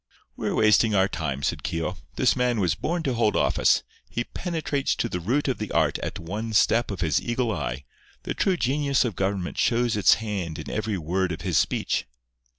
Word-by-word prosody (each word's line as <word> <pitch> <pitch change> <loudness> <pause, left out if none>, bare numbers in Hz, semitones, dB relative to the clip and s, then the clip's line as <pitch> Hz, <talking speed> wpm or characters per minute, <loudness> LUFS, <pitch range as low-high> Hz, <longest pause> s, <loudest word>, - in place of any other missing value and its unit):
"We're - - -2
wasting 110 0 +4
our 95 0 +4
time," 75 -6 -3
said - - -1
Keogh. 80 +2 -2 0.2
"This 130 - +3
man 125 -2 +1
was 90 -6 +2
born 165 - -2
to 135 - 0
hold 115 -3 +1
office. - - +3 0.3
He 120 - -2
penetrates 155 -3 -2
to - - -1
the 90 - -3
root 125 - 0
of 130 - -1
the 105 - -4
art 80 -3 +1
at - - -4
one 105 +7 -5
step 115 +3 +3
of 100 -3 -4
his 80 -3 +2
eagle 120 -1 -1
eye. 65 - -3 0.4
The - - -3
true 190 -2 +1
genius 140 -1 +1
of 115 -6 -3
government 95 -2 -2
shows 120 -1 +2
its 100 -4 +5
hand 100 -8 -4
in - - -6
every 110 -1 -2
word 90 +3 -1
of 80 - -5
his - - +2
speech." - - 0
105 Hz, 200 wpm, -25 LUFS, 85-120 Hz, 0.4 s, its